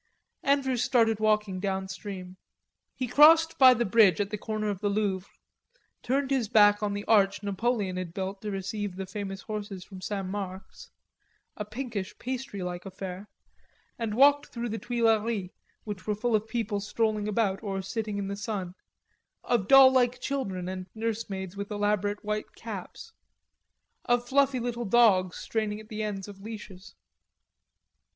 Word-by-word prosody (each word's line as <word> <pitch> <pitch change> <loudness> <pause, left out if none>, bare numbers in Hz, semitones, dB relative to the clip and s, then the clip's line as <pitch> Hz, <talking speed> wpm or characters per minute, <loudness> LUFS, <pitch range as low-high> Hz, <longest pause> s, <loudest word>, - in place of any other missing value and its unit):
Andrews 265 -3 +1
started 225 -4 +3
walking 210 -3 +1
downstream. 190 -1 -5 0.6
He 255 - -2
crossed 320 +5 +6
by 260 -2 +9
the 240 +1 0
bridge 200 -4 +5
at 205 -1 -1
the 210 - -2
corner 215 -1 -2
of 195 - -5
the 205 0 0
Louvre, 200 -2 -1 0.7
turned 270 +2 0
his 250 -6 +1
back 205 -2 +5
on 205 -1 -1
the 205 0 -4
arch 200 -2 +3
Napoleon 200 -2 -1
built 190 +3 -5
to 215 - -4
receive 200 0 -4
the 190 0 -5
famous 195 0 -6
horses 205 -3 -5
from 190 -2 -11
St. 195 0 -3
Marc's, 190 0 -7 0.7
a 210 - -4
pinkish 215 -3 -5
pastry 255 -6 -5
like 180 0 -5
affair 190 +1 -7 0.7
and 225 -2 -2
walked 285 +3 +5
through 240 0 -5
the 220 +1 -3
Tuileries 225 -5 0 0.3
which 205 -3 -7
were 210 - +1
full 230 +2 0
of 215 +1 0
people 220 -3 -2
strolling 210 0 -1
about 205 -2 0
or 195 -3 -3
sitting 215 0 -3
in 200 -1 -3
the 200 - -3
sun, 200 -4 -4 0.7
of 230 -6 0
doll 270 0 +9
like 250 -1 +2
children 195 -11 -3
and 185 0 -5
nursemaids 210 -4 -4
with 200 0 -5
elaborate 205 0 -1
white 210 0 -3
caps, 455 - -8 0.9
of 245 0 +1
fluffy 270 0 +3
little 240 0 -3
dogs 195 -5 +4
straining 215 -2 -2
at 215 0 -13
the 215 0 -4
ends 205 -2 -4
of 200 -1 -11
leashes. 205 -3 -9
210 Hz, 155 wpm, -28 LUFS, 195-235 Hz, 0.9 s, by